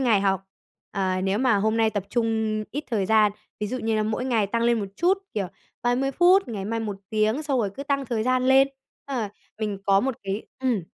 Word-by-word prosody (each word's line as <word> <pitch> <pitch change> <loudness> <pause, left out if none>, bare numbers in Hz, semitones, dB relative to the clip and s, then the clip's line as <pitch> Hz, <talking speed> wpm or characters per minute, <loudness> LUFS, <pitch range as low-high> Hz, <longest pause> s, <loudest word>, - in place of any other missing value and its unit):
ngày 230 -6 +3
học, 195 -1 +1 0.5
ờ, 185 -1 0
nếu 195 +2 +1
mà 250 -3 +3
hôm 220 +2 +1
nay 225 -1 +3
tập 205 -2 -2
trung 220 -2 0
ít 290 +2 -4
thời 205 -5 +1
gian. 215 0 +4 0.3
Ví 210 - 0
dụ 255 +5 -3
như 225 -1 0
là 215 - +2
mỗi 220 +3 -1
ngày 230 -6 +2
tăng 230 +3 -1
lên 235 -1 +3
một 200 - -3
chút, 370 +3 +3 0.2
kiểu 200 -4 -1 0.4
30 245 +3 +1
phút, 355 +3 +5
ngày 205 -5 -4
mai 230 +3 -2
1 210 -3 -3
tiếng, 215 +6 +1
xong 280 -4 0
rồi 210 -4 0
cứ 275 - -5
tăng 280 -1 0
thời 225 -2 -1
gian 255 +1 +2
lên. 270 +1 +6 0.4
Ờ, 245 -7 -2 0.3
mình 210 -3 -2
có 195 -1 +5
một 265 +2 -1
cái 195 +2 -3 0.2
ừm, 250 -7 0
225 Hz, 230 wpm, -25 LUFS, 205-255 Hz, 0.5 s, lên